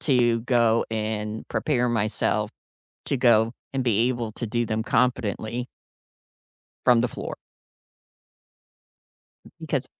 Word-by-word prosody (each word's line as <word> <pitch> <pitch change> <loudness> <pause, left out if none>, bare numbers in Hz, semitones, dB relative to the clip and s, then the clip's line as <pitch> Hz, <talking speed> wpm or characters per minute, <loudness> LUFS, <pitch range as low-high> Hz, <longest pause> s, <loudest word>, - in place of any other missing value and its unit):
to 120 -5 +3
go 115 -2 +3
and 110 0 -3
prepare 125 -5 +1
myself 110 -1 0 0.6
to - - +1
go 115 -3 +4 0.2
and 130 -1 0
be 115 +1 +3
able 120 -3 -3
to 120 - -5
do 120 +2 0
them 110 0 -1
competently. 120 0 0 1.2
From 120 -2 +6
the 120 - +1
floor. - - -6 2.2
Because - - -2
115 Hz, 110 wpm, -25 LUFS, 110-125 Hz, 2.2 s, From